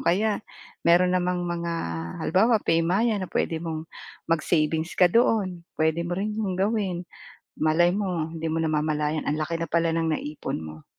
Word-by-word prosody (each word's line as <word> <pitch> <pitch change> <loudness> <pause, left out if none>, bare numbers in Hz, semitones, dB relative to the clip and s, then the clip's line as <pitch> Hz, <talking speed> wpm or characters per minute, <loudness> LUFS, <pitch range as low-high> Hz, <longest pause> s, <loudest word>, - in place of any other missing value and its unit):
kaya 210 +4 +1 0.4
mayro'n 180 +2 +4
namang 180 0 0
mga 170 -1 -2 0.5
halimbawa 220 +7 +4
PayMaya 190 +7 +2
na 185 - -4
puwede 160 -1 -1
mong 160 -1 -4 0.4
mag-savings 160 0 +1
ka - - +6
doon, 210 -7 +2 0.2
puwede 160 +1 +1
mo 175 - -2
rin 210 +2 -1
'yong 205 -4 -2
gawin. 195 -3 0 0.5
Malay 165 +3 +3
mo 180 -6 -1
hindi 160 0 -7
mo 165 - 0
namamalayan 155 -1 0
ang 150 +1 -1
laki 165 +2 -1
na 165 - -2
pala 165 +1 +2
ng 165 -1 +1
na-ipon 150 - -4
mo. 80 -1 -9
170 Hz, 160 wpm, -25 LUFS, 160-185 Hz, 0.5 s, ka